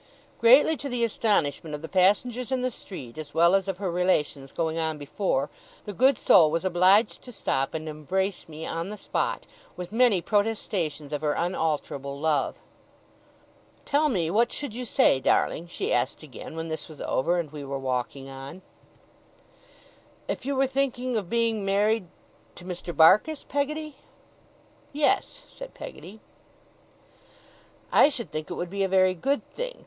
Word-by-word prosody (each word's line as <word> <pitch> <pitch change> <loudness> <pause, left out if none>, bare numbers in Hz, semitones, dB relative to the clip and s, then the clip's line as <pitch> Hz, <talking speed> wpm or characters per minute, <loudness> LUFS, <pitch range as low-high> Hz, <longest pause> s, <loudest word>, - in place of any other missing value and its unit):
Greatly 265 +7 +6
to 280 - -5
the 245 -2 -1
astonishment 165 -9 0
of 150 - -9
the - - -4
passengers 215 +8 +2
in 260 -1 0
the 255 - 0
street, 140 - -9
as 150 -2 -9
well 170 +2 +5
as 195 0 +2
of 190 -2 -2
her 190 -2 -2
relations 155 -6 0
going 165 -1 -2
on 160 -1 -1
before, 145 0 -1 0.4
the 205 - -5
good 260 +4 +4
soul 165 -7 +6
was 165 +4 -1
obliged 185 +4 +4
to 250 - -11
stop 135 - -1
and 160 0 -4
embrace 180 +6 -3
me 160 +1 -7
on 165 +3 -3
the 210 - -6
spot, - - -2 0.3
with 180 0 -6
many 230 -4 +4
protestations 185 -8 -1
of 150 - -2
her 150 -1 +1
unalterable 150 -5 -2
love. 150 -2 +1 1.3
'Tell 300 +1 +2
me 170 - 0
what 230 +4 +2
should 285 -7 -4
you 250 +2 -5
say, 135 - +3
darling?' 165 +5 +1
she 170 - -2
asked 125 +5 -1
again, 155 +2 -9
when 165 0 -4
this 160 0 -5
was 155 - -12
over, 170 +7 0
and 160 -4 -4
we 150 -2 -7
were 140 0 -4
walking 135 +1 -3
on. 135 +7 -9 1.6
'If - - -4
you 280 - 0
were 270 +1 +3
thinking 255 -2 -1
of 200 -6 -2
being 230 -2 +1
married 200 +1 +1 0.5
to 175 - -12
Mr. 180 -1 -5
Barkis, 200 - +5
Peggotty?' 300 +1 -2 1.0
'Yes,' 295 0 0
said - - -11
Peggotty. 220 - -10 1.7
'I - - +6
should 250 -5 -6
think 155 0 -5
it - - -4
would 175 0 -4
be 200 0 -3
a - - +2
very 185 -1 +4
good 275 - -1
thing. - - -5
185 Hz, 165 wpm, -26 LUFS, 155-230 Hz, 1.7 s, Greatly